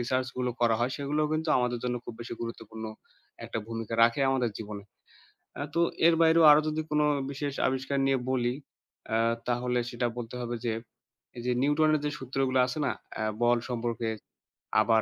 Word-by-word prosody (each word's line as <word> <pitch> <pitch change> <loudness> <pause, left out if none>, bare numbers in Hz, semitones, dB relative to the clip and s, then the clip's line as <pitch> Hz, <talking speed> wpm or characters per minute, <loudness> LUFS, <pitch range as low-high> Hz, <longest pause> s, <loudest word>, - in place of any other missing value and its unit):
research 130 +2 0
গুলো 125 -1 0
করা 115 -1 +4
হয় 125 +2 +1
সেগুলোও 150 +2 0
কিন্তু 155 0 -1
আমাদের 125 -1 0
জন্য 125 0 0
খুব 115 - -7
বেশি 120 - -5
গুরুত্বপূর্ণ 115 -1 -7 0.6
একটা - - -4
ভূমিকা 115 0 -4
রাখে 115 +3 +4
আমাদের 125 -3 +1
জীবনে। 105 -2 -7 0.7
অ্যা 145 - -4
তো - - +4 0.3
এর 170 - +6
বাইরেও 165 0 +6
আরও 150 - +6
যদি 155 +1 -1
কোনো 150 0 +3 0.3
বিশেষ 140 0 -3
আবিষ্কার 135 +1 -1
নিয়ে 135 -1 +3
বলি 125 -1 +1 0.5
অ্যা 110 0 +1 0.3
তাহলে 125 0 +1
সেটা 120 0 -1
বলতে 120 0 -6
হবে 120 0 -3
যে, 115 - +1 0.7
এই - - -5
যে 125 - +2
নিউটনের 155 +2 +3
যে 150 - 0
সূত্রগুলা 130 0 0
আছে 130 +4 -4
না - - +1 0.2
অ্যা 110 - -2 0.2
বল 120 0 +4
সম্পর্কে, 115 -1 -2 0.7
আবার 110 0 +4
125 Hz, 175 wpm, -29 LUFS, 120-140 Hz, 0.7 s, এর